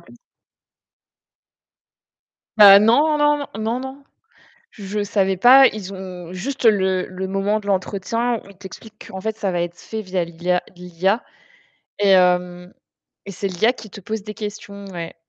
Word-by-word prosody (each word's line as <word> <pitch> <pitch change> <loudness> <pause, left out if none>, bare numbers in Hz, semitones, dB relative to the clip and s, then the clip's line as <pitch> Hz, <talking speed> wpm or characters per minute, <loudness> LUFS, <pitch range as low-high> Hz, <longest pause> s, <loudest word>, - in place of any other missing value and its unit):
p - - -19 2.5
Bah 200 -1 +9
non, 290 +9 +3
non, 295 0 +3
non. 285 - -6
N 215 - -5
non, 230 +3 -1
non. 265 +2 -9 0.7
Je 205 -1 -5
savais 195 -1 0
pas, 260 +7 +7
ils 200 -2 -7
ont 180 -2 -9
juste 250 +10 -6
le 190 -4 +2
le 185 +1 -6
moment 195 +2 -1
de 205 - -12
l'entretien 205 +5 -1
où - - -16
ils 195 - -17
t'expliquent 215 +3 -13
qu'en 190 - -7
fait, 220 +2 -4
ça 200 -4 -3
va 175 -1 -1
être 175 0 -5
fait 220 -1 -7
via 185 -2 -2
l'IA 175 +2 -2
l'IA 180 +5 -2 0.8
et 200 -2 +4
heu 180 0 0 0.5
et 200 - -8
c'est 195 +1 -5
l'IA 195 +7 +1
qui 225 - -12
te 200 0 -12
pose 215 +2 -5
des 210 0 -8
questions, 205 -1 -8
ouais. 170 -2 -7
200 Hz, 165 wpm, -20 LUFS, 185-220 Hz, 2.5 s, Bah